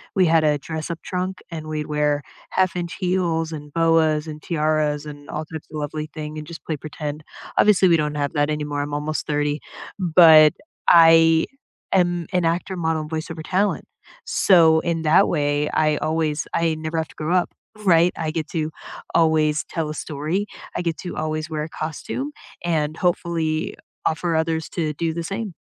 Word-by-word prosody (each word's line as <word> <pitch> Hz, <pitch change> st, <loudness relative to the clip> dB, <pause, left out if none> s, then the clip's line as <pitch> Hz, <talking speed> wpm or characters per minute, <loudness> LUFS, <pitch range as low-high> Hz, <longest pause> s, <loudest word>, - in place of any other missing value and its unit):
we 190 Hz, -2 st, +4 dB
had 165 Hz, -1 st, +4 dB
a 150 Hz, -1 st, +3 dB
dress-up 160 Hz, +2 st, -5 dB
trunk, 185 Hz, 0 st, -3 dB
and 160 Hz, -2 st, -6 dB
we'd 155 Hz, -1 st, -3 dB
wear 150 Hz, -1 st, +1 dB, 0.3 s
half-inch 180 Hz, -1 st, 0 dB
heels, 175 Hz, -4 st, 0 dB
and 150 Hz, -2 st, -8 dB
boas, 165 Hz, -2 st, +2 dB
and 155 Hz, -1 st, -7 dB
tiaras, 155 Hz, -2 st, 0 dB
and 145 Hz, -1 st, -10 dB
all 155 Hz, -, -4 dB
types 160 Hz, 0 st, -8 dB
of 155 Hz, -, -5 dB
lovely 150 Hz, +1 st, -4 dB
thing, 155 Hz, 0 st, -6 dB
and 150 Hz, -, -7 dB
just 170 Hz, 0 st, -9 dB
play 155 Hz, -, -2 dB
pretend. 150 Hz, +1 st, -6 dB, 0.3 s
Obviously, 200 Hz, -3 st, +5 dB
we 170 Hz, -, +5 dB
don't 150 Hz, -1 st, -1 dB
have 145 Hz, -1 st, -1 dB
that 145 Hz, -1 st, +1 dB
anymore, 150 Hz, -1 st, -2 dB
I'm 145 Hz, 0 st, -4 dB
almost 150 Hz, +1 st, -2 dB
30, 150 Hz, 0 st, 0 dB, 0.4 s
but 160 Hz, -4 st, +7 dB, 0.4 s
I 165 Hz, -1 st, +7 dB, 0.5 s
am 175 Hz, -3 st, +2 dB
an 180 Hz, -2 st, +2 dB
actor, 175 Hz, +3 st, -1 dB
model, 160 Hz, -2 st, 0 dB
and 150 Hz, -, -9 dB
voice 160 Hz, +1 st, -3 dB
over 160 Hz, -1 st, -6 dB
talent. 195 Hz, +4 st, 0 dB, 0.4 s
So 165 Hz, -4 st, +5 dB
in 170 Hz, -1 st, -1 dB
that 155 Hz, 0 st, +5 dB
way, 145 Hz, -2 st, +1 dB
I 155 Hz, -1 st, +2 dB
always 155 Hz, -1 st, -1 dB
I 165 Hz, -1 st, +1 dB
never 155 Hz, +1 st, -4 dB
have 160 Hz, 0 st, -1 dB
to -, -, -17 dB
grow 160 Hz, +4 st, -1 dB
up, 180 Hz, -, +1 dB, 0.3 s
right? 170 Hz, -1 st, +5 dB
I 160 Hz, -2 st, -2 dB
get 160 Hz, -1 st, -3 dB
to 160 Hz, -3 st, -2 dB, 0.4 s
always 155 Hz, -2 st, +3 dB
tell 160 Hz, -3 st, -2 dB
a -, -, -3 dB
story, 155 Hz, +9 st, -3 dB, 0.3 s
I -, -, -1 dB
get 170 Hz, -2 st, -2 dB
to 180 Hz, -, -6 dB
always 155 Hz, 0 st, -2 dB
wear 155 Hz, -1 st, -3 dB
a 155 Hz, -, -6 dB
costume 160 Hz, -, -4 dB, 0.3 s
and 155 Hz, -2 st, 0 dB
hopefully, 165 Hz, -3 st, -1 dB, 0.3 s
offer 165 Hz, +1 st, 0 dB
others 160 Hz, 0 st, 0 dB
to 155 Hz, -3 st, -2 dB
do 165 Hz, +2 st, -2 dB
the 170 Hz, -, -3 dB
same. 195 Hz, +2 st, -4 dB
160 Hz, 180 wpm, -22 LUFS, 150-170 Hz, 0.5 s, but